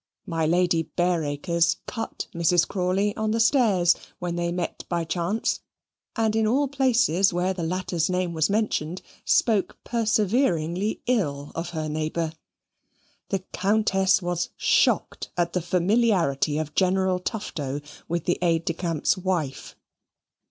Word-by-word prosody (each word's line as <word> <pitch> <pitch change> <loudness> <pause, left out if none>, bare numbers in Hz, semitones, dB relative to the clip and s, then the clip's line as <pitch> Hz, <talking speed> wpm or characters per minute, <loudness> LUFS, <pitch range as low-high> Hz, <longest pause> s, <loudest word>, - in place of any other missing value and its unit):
My 165 -2 -1
Lady 170 -1 +2
Bareacres 170 -1 +1
cut 225 - -5
Mrs. 170 +1 +3
Crawley 195 +2 0
on 220 0 -1
the 225 +1 0
stairs 220 -8 +4 0.2
when 175 -1 -3
they 170 0 -1
met 175 0 -3
by 170 -1 0
chance; 175 +6 -1 0.6
and 220 -2 +1
in 220 -1 +2
all 275 +6 +2
places 245 - +3
where 180 +2 0
the 180 - -5
latter's 175 0 -1
name 180 -1 -1
was 160 +1 +1
mentioned, 190 -5 -1 0.2
spoke 215 -5 +2
perseveringly 210 - 0
ill 145 - -1
of 165 +1 -4
her 160 -2 -3
neighbour. 155 +1 -2 1.0
The 195 -2 -1
Countess 195 -2 +2
was 175 -1 -1
shocked - - +2
at 170 -1 0
the 180 - 0
familiarity 175 - +2
of 155 -1 -3
General 190 0 +2
Tufto 150 - -4 0.3
with 170 -1 -2
the 175 - 0
aide 165 -2 +1
de 170 - 0
camp's 165 -3 0
wife. 175 -7 -3
180 Hz, 135 wpm, -25 LUFS, 165-205 Hz, 1.0 s, stairs